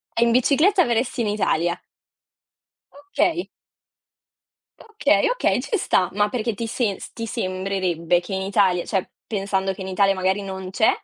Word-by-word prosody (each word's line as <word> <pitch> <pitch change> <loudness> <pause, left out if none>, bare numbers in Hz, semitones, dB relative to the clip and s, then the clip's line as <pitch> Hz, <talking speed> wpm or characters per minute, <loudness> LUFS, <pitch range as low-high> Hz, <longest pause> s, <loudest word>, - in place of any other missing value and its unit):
E 230 - +1
in 235 - +2
bicicletta 310 - +4
verresti 240 +1 0
in 215 - -1
Italia? 175 -4 0 1.4
Okay. 345 +1 +1 1.3
Okay, 445 +2 +1
okay, - - +1
ci 440 - -2
sta. 185 - +1
Ma 205 +1 +1
perché 230 -1 -2
ti 230 +3 -4
se 220 -3 -1
ti 230 -1 -5
sembrerebbe 185 -3 -1
che 185 +3 -9
in 190 - -2
Italia 190 -3 +2
cioè, 190 -3 -2 0.2
pensando 195 -2 -1
che 190 - -8
in 190 - -6
Italia 195 +1 +2
magari 190 +2 0
non 190 -1 -6
c'è, 220 +3 +3
200 Hz, 150 wpm, -22 LUFS, 190-235 Hz, 1.4 s, bicicletta